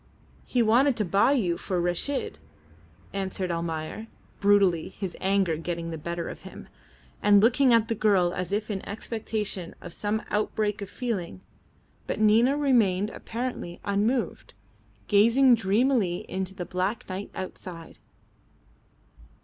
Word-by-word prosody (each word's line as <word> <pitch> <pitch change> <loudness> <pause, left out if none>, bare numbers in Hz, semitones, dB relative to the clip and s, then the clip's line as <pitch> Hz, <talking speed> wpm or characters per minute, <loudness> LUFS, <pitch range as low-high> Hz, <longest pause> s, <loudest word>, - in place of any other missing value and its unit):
"He 245 -2 +2
wanted 245 +4 +4
to 210 - 0
buy 200 +9 +3
you 180 -11 0
for 185 -3 -2
Reshid," 175 - -1 0.7
answered 190 -2 -2
Almayer, 165 +5 -4 0.3
brutally, 200 -5 +3
his 190 -4 -6
anger 190 -4 +2
getting 165 0 -4
the 160 - -4
better 170 +2 -4
of - - -7
him, - - -11 0.5
and 205 0 +6
looking 250 +5 +4
at 230 -1 +4
the 230 - 0
girl 195 -5 +2
as 180 0 -4
if 210 +1 -1
in 195 -2 -4
expectation 210 -4 -4
of 175 - -10
some 215 +1 -2
outbreak 210 0 -1
of 200 - -6
feeling. 190 - -4 0.7
But - - -2
Nina 225 +6 +4
remained 215 -8 +2
apparently 230 -7 -5
unmoved, 205 - -1 0.5
gazing 235 +6 +5
dreamily 215 -3 +1
into 190 0 -4
the 180 - -5
black 185 +6 -2
night 190 +1 -5
outside. 180 -3 -8
200 Hz, 135 wpm, -27 LUFS, 180-225 Hz, 0.7 s, and